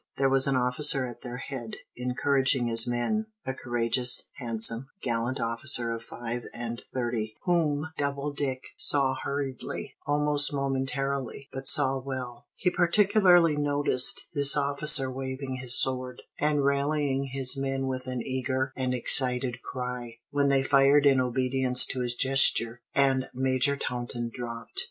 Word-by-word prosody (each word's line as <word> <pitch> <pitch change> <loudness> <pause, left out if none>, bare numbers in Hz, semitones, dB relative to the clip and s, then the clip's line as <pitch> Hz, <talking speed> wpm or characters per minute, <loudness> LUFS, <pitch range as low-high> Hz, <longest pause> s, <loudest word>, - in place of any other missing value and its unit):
There 135 0 +1
was 135 0 +4
an 135 - 0
officer 130 +2 +3
at 120 -2 -10
their 125 -1 -8
head, 130 -4 -8 0.2
encouraging 130 +1 0
his 115 +1 +5
men, 120 - -2 0.2
a 130 - -3
courageous, 120 0 0
handsome, 115 0 0 0.2
gallant 120 +2 -3
officer 115 +1 +2
of 115 0 -5
five 120 +1 -7
and 120 0 -6
thirty, 120 -4 -4
whom 160 -3 -1
Doubledick 140 -2 -4
saw 135 -2 +2
hurriedly, 135 -1 -6
almost 145 0 +1
momentarily, 135 -1 -4
but 135 0 -7
saw 135 -2 +2
well. 125 -3 -8
He 180 - -1
particularly 180 -2 +3
noticed 145 -3 +2
this 140 -1 +5
officer 140 -1 +4
waving 130 0 -6
his 125 -1 +3
sword, 130 -1 -2 0.2
and 150 -1 0
rallying 140 -1 -1
his 135 0 +2
men 135 0 -3
with 130 -1 -5
an 125 -2 -4
eager 130 0 -3
and 130 -1 -2
excited 125 -1 +3
cry, 125 -2 -7
when 145 -1 0
they 135 -1 +1
fired 140 +1 +3
in 135 -2 +4
obedience 130 0 +2
to 130 - -4
his 120 -1 -1
gesture, 120 -3 +5
and 135 -1 +1
Major 130 +2 +1
Taunton 120 -2 -5
dropped. 115 -2 -5
130 Hz, 140 wpm, -26 LUFS, 125-140 Hz, 0.2 s, his